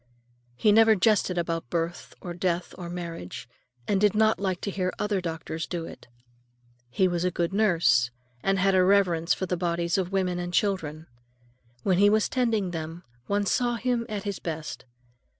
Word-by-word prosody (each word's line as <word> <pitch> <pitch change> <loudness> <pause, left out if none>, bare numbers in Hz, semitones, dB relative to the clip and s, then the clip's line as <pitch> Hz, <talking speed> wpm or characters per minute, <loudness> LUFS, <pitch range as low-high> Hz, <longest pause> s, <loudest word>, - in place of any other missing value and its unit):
He 210 - +3
never 220 +1 +6
jested 195 -2 +2
about 165 -6 -2
birth 170 +1 -3
or 175 - -5
death 175 0 -2
or 175 -2 -7
marriage, 170 - -6 0.4
and 200 -1 +1
did 210 -1 +3
not 220 0 +3
like 190 -2 -1
to 200 - -3
hear 185 -1 -1
other 210 -2 -1
doctors 165 -1 -4
do 170 -2 -4
it. - - -11 0.8
He 185 +9 +2
was 175 -1 -1
a 180 - +2
good 175 0 -2
nurse, 165 - +3 0.3
and 195 0 +1
had 195 +1 +3
a 185 -1 +5
reverence 180 -4 +3
for 190 - -3
the 180 - -1
bodies 170 +1 0
of 185 0 -2
women 185 -2 0
and 175 0 -3
children. 160 -6 -1 0.8
When 185 -2 +2
he 205 +1 +6
was 215 0 +2
tending 225 -7 0
them, 165 +1 -6 0.2
one 205 0 +1
saw 240 +4 +1
him 235 0 -1
at 205 -2 -4
his 200 -2 -4
best. 160 -5 -5
180 Hz, 180 wpm, -26 LUFS, 170-200 Hz, 0.8 s, never